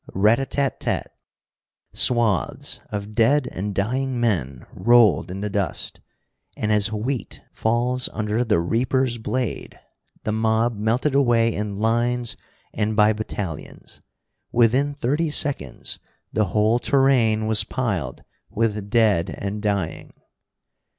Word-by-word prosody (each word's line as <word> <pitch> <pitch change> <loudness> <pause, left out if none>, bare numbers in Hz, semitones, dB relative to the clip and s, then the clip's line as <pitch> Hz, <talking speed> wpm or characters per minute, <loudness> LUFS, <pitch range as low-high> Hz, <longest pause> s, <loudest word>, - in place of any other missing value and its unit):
Rat 105 +5 +4
a 135 - -2
tat 140 -1 -1
tat. - - -2 0.8
Swaths 115 -7 +1
of 105 0 -5
dead 125 +5 +3
and 100 +1 -4
dying 125 +5 -1
men 75 - -1
rolled 115 -9 +4
in 95 +2 -5
the 105 - -2
dust, 100 -1 -3 0.6
and, 105 - -1
as 105 0 +2
wheat 115 +4 -3
falls 120 +3 0
under 110 +2 -1
the 105 -7 +2
reaper's 120 +6 0
blade, 125 +2 -3 0.4
the 110 - -1
mob 110 +2 +1
melted 115 +7 0
away 120 -4 +3
in 105 -1 -4
lines 120 +2 0 0.4
and 110 0 -1
by 105 0 +5
battalions. 105 -6 -6 0.5
Within 130 +5 +2
thirty 145 +5 0
seconds 140 - 0 0.3
the 110 - +2
whole 105 +5 +2
terrain 120 -6 +3
was 110 0 +2
piled 95 - -3 0.3
with 105 -2 -1
dead 105 -6 +3
and 100 +1 -4
dying. 100 -5 -2
110 Hz, 125 wpm, -23 LUFS, 105-125 Hz, 0.8 s, by